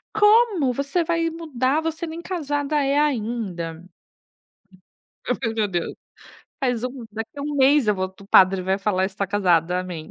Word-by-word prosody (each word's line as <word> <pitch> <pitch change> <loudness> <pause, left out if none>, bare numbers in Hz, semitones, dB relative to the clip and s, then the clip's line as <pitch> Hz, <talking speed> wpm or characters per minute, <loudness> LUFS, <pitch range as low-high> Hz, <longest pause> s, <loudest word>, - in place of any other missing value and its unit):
"Como, 420 - +4
você 280 +6 -1
vai 330 0 0
mudar, 300 -3 -1
você 325 +1 -3
nem 325 +1 -7
casada 295 -5 -2
é 275 +1 +1
ainda". 210 - -2 1.4
Eu 250 - +1
fiz: 230 -3 -3
"Meu 215 -2 0
Deus, 175 -3 -3 0.7
faz 245 -5 -1
um 250 -1 -5
daqui 225 +6 -7
1 290 +1 -3
mês 275 -2 +4
eu 210 - +3
vou 185 0 -2
t 190 +1 -17
o - - -17
padre 190 -1 +5
vai 190 +1 0
falar: 195 -2 0
está 195 +1 -3
casada, 180 -3 +2
amém". 175 -4 -7
250 Hz, 165 wpm, -23 LUFS, 190-300 Hz, 1.4 s, padre